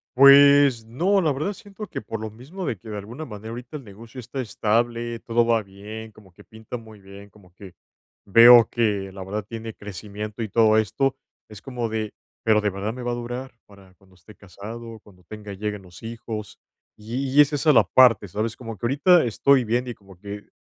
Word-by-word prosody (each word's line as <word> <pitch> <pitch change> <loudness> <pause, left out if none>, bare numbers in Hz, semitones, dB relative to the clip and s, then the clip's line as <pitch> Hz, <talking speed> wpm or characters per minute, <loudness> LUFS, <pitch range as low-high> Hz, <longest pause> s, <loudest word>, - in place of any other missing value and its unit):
Pues 140 -2 +7
no, 180 - +1
la 155 -3 +1
verdad, 155 +10 -2
siento 205 +2 -10
que - - -6
por 110 +1 -6
lo 110 -1 -6
mismo 155 - -8
de 115 - -2
que 110 +3 -13
de 105 - -5
alguna 115 +10 -8
manera 110 -2 -9
ahorita 125 +5 -7
el 135 - -12
negocio 115 +4 -12
está 130 +2 -5
estable. 115 +1 -1
Todo 115 0 +1
va 115 -1 +2
bien, 105 +3 -10
como 100 -4 -19
que - - -17
pinta 110 +2 -9
muy 110 -2 -14
bien, 100 +1 -13
como 95 -3 -21
que 95 -2 -13 0.5
veo 115 +2 +8
que, 105 -5 -1
la 95 -1 -7
verdad, 105 +2 -4
tiene 115 -1 -7
crecimiento 105 +2 -8
y 110 - -3
todo 110 0 +4
esto. 135 +5 0 0.3
Es 105 -2 -12
como 125 -4 -4
de, 110 -1 -3 0.3
pero, 110 -1 +3
¿de 105 - +1
verdad 100 +4 -4
me 125 - -8
va 120 - -2
a - - -1
durar 120 +2 -6
para 100 -2 -18
cuando 95 -1 -25
esté 90 +4 -17
casado, 110 +4 -10
cuando 90 -3 -20
tenga 105 +2 -9
lleguen 105 0 -5
los 90 -2 -15
hijos?, 115 -2 -7 0.4
y 125 +5 -4
y - - +10
es 145 +1 +2
esa 150 +2 +3
la - - +6
parte, 115 -6 +4
¿sabes?, 105 +4 -3
como 115 -3 -7
que 105 - -6
ahorita 160 +6 +4
estoy 125 +2 +3
viendo, 120 +3 -1
y - - -6
como 95 -3 -18
que, 100 +1 -8
eh 100 - -18
110 Hz, 215 wpm, -23 LUFS, 105-125 Hz, 0.5 s, y